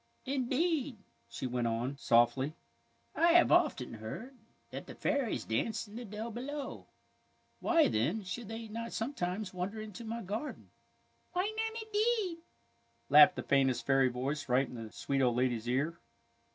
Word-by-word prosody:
" -, -, -40 dB
Indeed," 275 Hz, +1 st, 0 dB, 0.3 s
she -, -, -5 dB
went 120 Hz, -1 st, 0 dB
on, 120 Hz, +4 st, -1 dB
softly, 130 Hz, +3 st, +3 dB, 0.3 s
" -, -, -40 dB
I 335 Hz, 0 st, +5 dB
have 345 Hz, 0 st, +6 dB
often 300 Hz, -, +3 dB
heard 115 Hz, -, -7 dB, 0.4 s
that -, -, -7 dB
the -, -, -9 dB
fairies 280 Hz, -6 st, 0 dB
dance 210 Hz, -, -1 dB
in 205 Hz, -, -12 dB
the 240 Hz, +1 st, -6 dB
dell 215 Hz, +3 st, -5 dB
below. 270 Hz, +5 st, -6 dB, 0.7 s
Why, 335 Hz, -2 st, +4 dB
then, 155 Hz, -, 0 dB
should 200 Hz, +5 st, -5 dB
they 225 Hz, +1 st, -6 dB
not 230 Hz, +2 st, -5 dB
sometimes 210 Hz, -5 st, -3 dB
wander 185 Hz, +4 st, -3 dB
into 215 Hz, +2 st, -7 dB
my 230 Hz, +1 st, -4 dB
garden? 215 Hz, +10 st, -5 dB, 0.2 s
" -, -, -41 dB
" -, -, -41 dB
Why 375 Hz, +4 st, 0 dB
not, 445 Hz, 0 st, -2 dB
indeed? 430 Hz, -5 st, 0 dB, 0.4 s
" 115 Hz, 0 st, -40 dB
laughed 150 Hz, +1 st, +9 dB
the -, -, -4 dB
faintest 130 Hz, -4 st, +2 dB
fairy 135 Hz, -1 st, +4 dB
voice 135 Hz, +4 st, -3 dB
right 130 Hz, +2 st, +3 dB
in -, -, -11 dB
the 115 Hz, -3 st, -7 dB
sweet 135 Hz, +5 st, -1 dB
old 125 Hz, -2 st, +3 dB
lady's 120 Hz, -2 st, 0 dB
ear. 150 Hz, +7 st, 0 dB
205 Hz, 170 wpm, -32 LUFS, -, 0.7 s, laughed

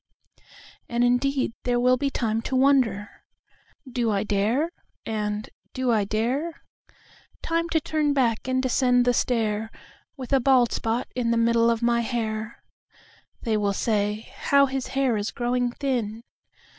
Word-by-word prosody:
And 235 Hz, 0 st, +1 dB
indeed 255 Hz, +1 st, +1 dB
there 245 Hz, -1 st, +1 dB
will 250 Hz, +1 st, +4 dB
be 275 Hz, +2 st, -1 dB
timeTo 225 Hz, -1 st, -2 dB
wonder, 255 Hz, -7 st, +3 dB, 0.8 s
"Do 240 Hz, -2 st, -1 dB
I 200 Hz, -1 st, 0 dB
dare?" 220 Hz, +10 st, 0 dB, 0.3 s
and, 210 Hz, +1 st, -3 dB, 0.3 s
"Do 255 Hz, -2 st, 0 dB
I 215 Hz, -3 st, +2 dB
dare?"Time 305 Hz, -, -4 dB
to 325 Hz, -, +2 dB
turn 305 Hz, -1 st, 0 dB
back 250 Hz, -5 st, +1 dB
and 260 Hz, 0 st, 0 dB
descend 250 Hz, -1 st, +3 dB
the 245 Hz, -, +3 dB
stair, 220 Hz, -3 st, 0 dB, 0.5 s
With 260 Hz, 0 st, -5 dB
a 270 Hz, -, +5 dB
bald 255 Hz, -2 st, +4 dB
spot 225 Hz, +2 st, -1 dB
in 245 Hz, -2 st, 0 dB
the 230 Hz, -, +2 dB
middle 230 Hz, 0 st, +3 dB
of 230 Hz, 0 st, 0 dB
my 235 Hz, 0 st, +3 dB
hair—(They 225 Hz, 0 st, -5 dB
will 205 Hz, -1 st, 0 dB
say: 210 Hz, +1 st, -1 dB
"How 280 Hz, 0 st, +4 dB
his 270 Hz, -1 st, -3 dB
hair 260 Hz, -5 st, +2 dB
is 205 Hz, +1 st, -2 dB
growing 245 Hz, 0 st, -1 dB
thin!") 235 Hz, -5 st, -3 dB
240 Hz, 140 wpm, -25 LUFS, 220-260 Hz, 0.8 s, a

